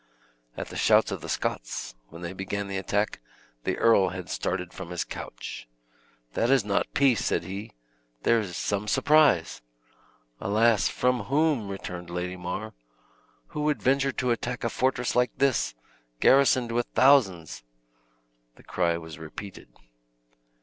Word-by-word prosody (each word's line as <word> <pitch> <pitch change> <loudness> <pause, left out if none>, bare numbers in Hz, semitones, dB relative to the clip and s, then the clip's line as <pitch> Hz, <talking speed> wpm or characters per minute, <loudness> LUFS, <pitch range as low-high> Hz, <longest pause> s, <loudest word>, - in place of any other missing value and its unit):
At - - -5
the - - -9
shouts - - +4
of - - -4
the - - -7
Scots, - - -3
when 85 +6 -11
they 85 +1 -4
began 100 +2 -4
the 100 -1 -3
attack, 105 +2 -1 0.5
the - - 0
earl 100 -5 +4
had 90 -1 -7
started 90 -1 -2
from - - -8
his 90 -1 -2
couch. - - -8 0.7
"That 115 - +1
is 135 -5 +4
not 100 -1 0
peace!" 135 -6 +3
said - - 0
he; 100 +5 -7 0.5
"there 115 - +4
is 95 -5 -5
some 105 +1 -2
surprise!" 140 - +3 0.8
"Alas, 110 +1 +3
from 125 -4 0
whom?" 140 -3 +1
returned 90 -3 -6
Lady 90 +1 -3
Mar; 90 +5 -5 0.8
"who 150 - -4
would 150 -1 0
venture 135 +1 +3
to 125 -1 -1
attack 120 +1 -2
a 115 - +1
fortress 130 -2 0
like 125 0 +1
this, 135 - +1 0.4
garrisoned 130 -3 +4
with 120 +1 0
thousands?" 100 - +3 0.9
The - - -19
cry 85 -2 0
was 80 -1 -9
repeated. 90 +5 -9
105 Hz, 145 wpm, -27 LUFS, 90-125 Hz, 0.9 s, shouts